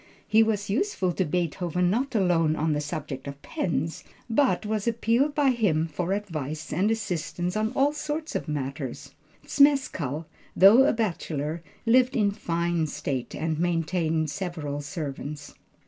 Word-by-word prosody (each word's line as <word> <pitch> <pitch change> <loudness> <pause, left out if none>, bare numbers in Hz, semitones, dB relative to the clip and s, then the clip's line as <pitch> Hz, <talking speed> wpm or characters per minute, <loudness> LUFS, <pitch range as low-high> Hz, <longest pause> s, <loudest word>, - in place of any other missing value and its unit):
He 220 +1 +5
was 210 -2 +1
useful 205 - 0
to 185 - 0
Beethoven 175 +2 0
not 255 +4 -1
alone 170 -6 +3
on 155 0 0
the 150 - -1
subject 145 -3 -5
of 140 0 -7
pens, 165 - -2 0.2
but 250 -1 +2
was 215 0 -2
appealed 235 +5 +2
to 295 - +1
by 275 - +5
him 190 -10 +1
for 170 +3 -3
advice 155 -7 -4
and 195 +4 +2
assistance 175 -5 -2
on 215 +1 0
all 280 +2 +3
sorts 305 +1 -4
of - - -3
matters. 140 -1 -4 0.3
Zmeskall, 225 - +2 0.3
though 220 +8 +8
a - - +3
bachelor, 165 -8 -2 0.2
lived 255 +3 +4
in 210 -4 +3
fine 170 -4 -1
state, 140 -4 -4
and 160 0 -2
maintained 165 -2 0
several 150 -4 -4
servants. 145 -1 -6
175 Hz, 145 wpm, -26 LUFS, 155-220 Hz, 0.3 s, though